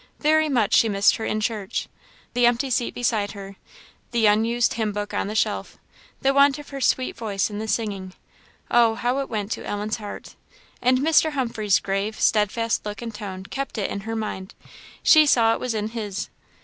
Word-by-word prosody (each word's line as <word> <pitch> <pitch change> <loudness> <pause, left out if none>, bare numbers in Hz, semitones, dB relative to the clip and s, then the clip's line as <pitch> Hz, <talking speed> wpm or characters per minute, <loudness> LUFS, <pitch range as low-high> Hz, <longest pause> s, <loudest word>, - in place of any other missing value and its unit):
Very 310 0 +3
much 235 -7 +1
she 225 - +5
missed 200 0 +3
her 225 - -4
in 215 - -1
church. 210 -3 -2 0.5
The 245 0 +4
empty 245 +3 +1
seat 240 0 0
beside 220 -4 0
her 195 -1 -9 0.5
the 235 -2 +1
unused 225 +3 +3
hymn 220 -2 -2
book 205 0 -4
on - - -1
the 210 - -5
shelf - - -1 0.5
the 270 0 +3
want 280 0 +5
of 295 - -11
her 275 -1 -6
sweet 255 0 +1
voice 210 -2 -2
in 205 - -5
the 220 - -4
singing 200 -5 -3 0.6
oh! 235 -2 +4
how 245 +3 0
it 275 - -3
went 215 -2 -3
to - - -3
Ellen's 210 +2 -3
heart! 210 -2 -8 0.5
And 255 +1 +3
Mr. 315 +2 +3
Humphreys' 230 -7 +1
grave, 200 +3 -3
steadfast 225 +2 +1
look 210 +2 -6
and 230 -1 -6
tone 195 -3 -7
kept 275 +5 -5
it 205 - -2
in - - -3
her 225 +3 -5
mind; 205 -3 -5 0.5
she 310 -2 +7
saw 225 -4 +4
it - - -3
was 250 -3 -2
in 215 0 -2
his. 210 -4 -5
225 Hz, 195 wpm, -23 LUFS, 205-245 Hz, 0.6 s, she